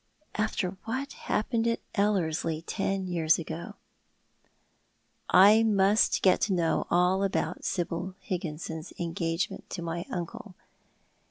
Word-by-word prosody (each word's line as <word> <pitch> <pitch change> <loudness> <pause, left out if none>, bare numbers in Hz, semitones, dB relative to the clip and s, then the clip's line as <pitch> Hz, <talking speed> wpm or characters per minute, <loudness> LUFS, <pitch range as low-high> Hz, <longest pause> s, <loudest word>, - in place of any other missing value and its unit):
"After 200 -3 -1
what 265 +5 -3
happened 225 +2 -1
at 230 - +1
Ellerslie 165 -6 0
ten 195 +1 -2
years 165 -3 +2
ago." 165 0 -6 1.5
I 205 +4 +7
must 210 -1 +3
get 185 - +4
to 200 - +1
know 170 -3 +1
all 180 +2 +3
about 195 - -1
Sibyl 175 +1 -2
Il'gginson's 160 -2 -4
engagement 165 0 -2
to 175 - -5
my 170 +1 -4
uncle. 185 +3 -6
185 Hz, 110 wpm, -28 LUFS, 170-205 Hz, 1.5 s, I